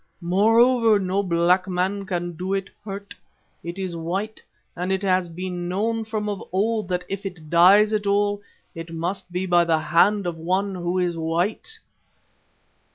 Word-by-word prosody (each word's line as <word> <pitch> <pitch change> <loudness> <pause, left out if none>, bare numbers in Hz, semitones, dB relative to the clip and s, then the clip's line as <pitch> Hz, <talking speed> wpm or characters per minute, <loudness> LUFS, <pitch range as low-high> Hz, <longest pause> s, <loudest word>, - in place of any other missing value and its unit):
Moreover, 225 +5 +4
no 190 0 0
black 180 0 +2
man 190 +2 -1
can 175 -3 -2
do 185 +4 -2
it 195 0 -4
hurt. 200 -1 -7 0.5
It 170 +2 -6
is 185 -3 -4
white, 190 +7 -4 0.3
and 180 +2 -3
it 190 +1 -1
has 185 -2 +1
been 175 0 -5
known 220 +4 -1
from 215 -1 -3
of 205 -2 -3
old 215 +2 0
that 180 -1 -2
if 195 +1 -5
it 175 -6 -8
dies 195 +5 +6
at 210 -1 -1
all, 205 0 +1 0.3
it 165 0 -8
must 175 +3 -4
be 180 +2 -2
by 175 -1 +4
the 165 -1 +2
hand 185 +6 +2
of 175 -2 -3
one 190 +4 -1
who 175 0 -2
is 175 -2 0
white. 175 - -2
185 Hz, 165 wpm, -23 LUFS, 175-205 Hz, 0.5 s, dies